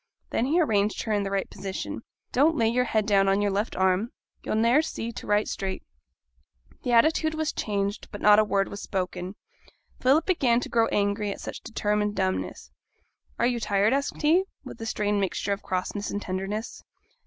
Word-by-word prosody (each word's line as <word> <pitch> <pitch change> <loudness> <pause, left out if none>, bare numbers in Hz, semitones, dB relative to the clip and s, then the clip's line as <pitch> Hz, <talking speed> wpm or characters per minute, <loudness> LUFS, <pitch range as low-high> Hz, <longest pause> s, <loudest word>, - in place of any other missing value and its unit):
Then 240 - +1
he 325 +5 +2
arranged 210 -9 +1
her 220 - -3
in 205 - +2
the 200 - -2
right 195 0 -1
position. 150 - -5 0.3
'Don't 305 +6 +3
lay 225 - +3
your 250 +2 +1
head 220 -3 +1
down 195 -2 +3
on 195 +1 +3
your 205 -1 +1
left 205 +4 -1
arm, 190 +4 +2 0.3
you'll - - -2
ne'er 235 +6 +4
see 235 -7 -4
to - - -9
write 210 +1 +2
straight.' 190 -1 -4 1.0
The 245 - -2
attitude 315 +6 +3
was 315 -1 -1
changed, 200 0 -2
but 205 - -7
not 210 0 +6
a - - +5
word 200 -2 +1
was 200 - -7
spoken. 185 0 -3 0.6
Philip 280 +6 +3
began 255 -10 +3
to - - -5
grow 230 -1 +3
angry 205 +1 0
at - - -6
such - - -7
determined 210 -1 -1
dumbness. 190 -1 -2 0.7
'Are - - +2
you 240 -1 +1
tired?' 205 +1 +2
asked 280 +2 -2
he, 340 +6 +4 0.2
with - - -9
a 225 - -4
strange 205 -2 0
mixture 195 +1 -1
of 200 - -5
crossness 185 +2 -3
and 205 - -2
tenderness. 195 +4 -4
210 Hz, 190 wpm, -26 LUFS, 200-235 Hz, 1.0 s, not